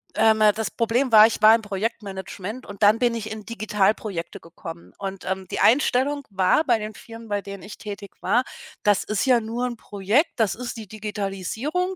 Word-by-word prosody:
ähm, 220 Hz, 0 st, +4 dB, 0.2 s
das 220 Hz, 0 st, -2 dB
Problem 235 Hz, +2 st, 0 dB
war, 215 Hz, -1 st, +9 dB
ich 225 Hz, -, -4 dB
war 220 Hz, +1 st, +8 dB
im 230 Hz, -, -2 dB
Projektmanagement 205 Hz, +1 st, -5 dB
und 205 Hz, +1 st, -6 dB
dann 210 Hz, +2 st, +6 dB
bin 240 Hz, -2 st, +2 dB
ich 215 Hz, -1 st, -5 dB
in 220 Hz, -1 st, -6 dB
Digitalprojekte 210 Hz, -4 st, -1 dB
gekommen 165 Hz, 0 st, -11 dB
und, 195 Hz, -2 st, -6 dB
ähm, 190 Hz, 0 st, -3 dB
die -, -, -2 dB
Einstellung 280 Hz, +2 st, +3 dB
war 190 Hz, +10 st, +3 dB
bei 240 Hz, -5 st, +3 dB
den 215 Hz, +1 st, -6 dB
Firmen, 230 Hz, +2 st, -11 dB
bei 205 Hz, -1 st, -1 dB
denen 200 Hz, -2 st, -9 dB
ich 205 Hz, -, -10 dB
tätig 200 Hz, -2 st, -8 dB
war: 245 Hz, -, +2 dB, 0.4 s
„Das 205 Hz, -2 st, +3 dB
ist 215 Hz, -2 st, -1 dB
ja 250 Hz, -3 st, +4 dB
nur 230 Hz, +3 st, -3 dB
'n 240 Hz, -1 st, -4 dB
Projekt, 215 Hz, -, +1 dB
das 220 Hz, -5 st, +2 dB
ist 245 Hz, 0 st, -6 dB
die 220 Hz, -2 st, -8 dB
Digitalisierung, 215 Hz, -, -3 dB
215 Hz, 190 wpm, -24 LUFS, 200-235 Hz, 0.4 s, war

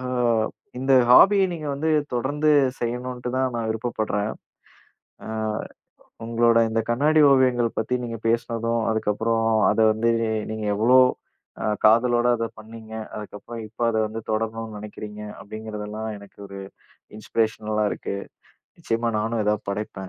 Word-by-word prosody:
அ -, -, -7 dB, 0.8 s
இந்த 135 Hz, +1 st, +1 dB, 0.2 s
ஹாபிய 195 Hz, +9 st, +7 dB
நீங்க 155 Hz, -3 st, -6 dB
வந்து 160 Hz, +3 st, -1 dB, 0.2 s
தொடர்ந்து 145 Hz, +5 st, +1 dB, 0.3 s
செய்யணுன்ட்டு 125 Hz, +1 st, -3 dB
தான் 130 Hz, -1 st, 0 dB
நான் 115 Hz, -, -2 dB
விருப்பப்படுறேன். 110 Hz, -2 st, -2 dB, 1.0 s
அ -, -, -7 dB, 1.0 s
உங்களோட 115 Hz, 0 st, +3 dB
இந்த 115 Hz, 0 st, 0 dB
கண்ணாடி 150 Hz, +6 st, +3 dB
ஓவியங்கள் 125 Hz, -3 st, +3 dB
பத்தி 110 Hz, +3 st, -1 dB
நீங்க 115 Hz, -1 st, -5 dB
பேசுனதும், 115 Hz, 0 st, 0 dB
அதுக்கப்பறம் 110 Hz, +1 st, 0 dB, 0.2 s
அத -, -, -1 dB
வந்து 115 Hz, +2 st, +1 dB, 0.4 s
நீங்க 110 Hz, -1 st, -4 dB
எவ்ளோ 120 Hz, +5 st, +5 dB, 0.6 s
அ -, -, -1 dB, 0.2 s
காதலோட 120 Hz, +2 st, +4 dB
அத 115 Hz, -, -1 dB
பண்ணீங்க, 110 Hz, 0 st, -11 dB, 0.2 s
அதுக்கப்பறம் 110 Hz, +2 st, -8 dB
இப்ப 110 Hz, +2 st, -13 dB
அத 110 Hz, -, -1 dB
வந்து 110 Hz, +1 st, -6 dB
தொடரணும்ன்னு 110 Hz, 0 st, -3 dB
நெனைக்கிறீங்க. 105 Hz, 0 st, -8 dB, 0.2 s
அப்டீங்கறதெல்லாம் 110 Hz, 0 st, -6 dB
எனக்கு 100 Hz, 0 st, -16 dB
ஒரு 100 Hz, -, -8 dB, 0.6 s
இன்ஸ்பிரேஷனலா 110 Hz, 0 st, -1 dB
இருக்கு. -, -, -4 dB, 0.6 s
நிச்சயமா 115 Hz, +1 st, -1 dB
நானும் 110 Hz, 0 st, -1 dB
எதாவது 105 Hz, -1 st, -1 dB
படைப்பேன். 105 Hz, +2 st, -5 dB
115 Hz, 125 wpm, -24 LUFS, 110-120 Hz, 1.0 s, ஹாபிய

